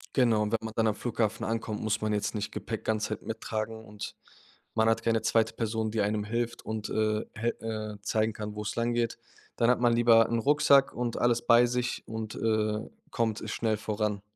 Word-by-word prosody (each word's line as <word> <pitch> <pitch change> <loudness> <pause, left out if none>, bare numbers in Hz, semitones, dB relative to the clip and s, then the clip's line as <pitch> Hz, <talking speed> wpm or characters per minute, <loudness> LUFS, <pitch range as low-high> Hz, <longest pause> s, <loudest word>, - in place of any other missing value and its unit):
Genau, 120 -5 +4
und 105 -1 -1
wenn 115 - +2
man 110 -1 -6
dann 115 -1 +2
am 105 - +1
Flughafen 115 -2 -1
ankommt, 110 -1 -2
muss 110 -1 0
man 110 0 0
jetzt 105 +1 -1
nicht 105 0 -3
Gepäck - - -5
ganze 110 -1 0
Zeit 110 - -4
mittragen 110 0 -4
und 105 -1 -7 0.6
man 110 0 +3
hat 115 0 +1
keine 115 -1 +2
2. 110 -1 +2
Person, 110 -1 -1
die 110 0 0
einem 105 +1 0
hilft 115 +2 -2
und, 110 0 -4
äh, 110 0 0
hel 115 +1 -1 0.4
äh, - - -32
zeigen 110 +1 0
kann, 105 0 -5
wo's 105 -1 -4
langgeht. 120 0 0 0.4
Dann 115 -1 +3
hat 125 - +3
man 120 -1 +4
lieber 115 -1 +6
'n 115 - +1
Rucksack 140 +1 +4
und 120 -1 -2
alles 120 -1 +2
bei 120 +1 +7
sich 120 0 -2
und, 110 -1 -5
äh, 110 -1 0 0.2
kommt 115 -1 -1
schnell 110 -1 0
voran. 105 -1 -2
110 Hz, 200 wpm, -29 LUFS, 110-115 Hz, 0.6 s, bei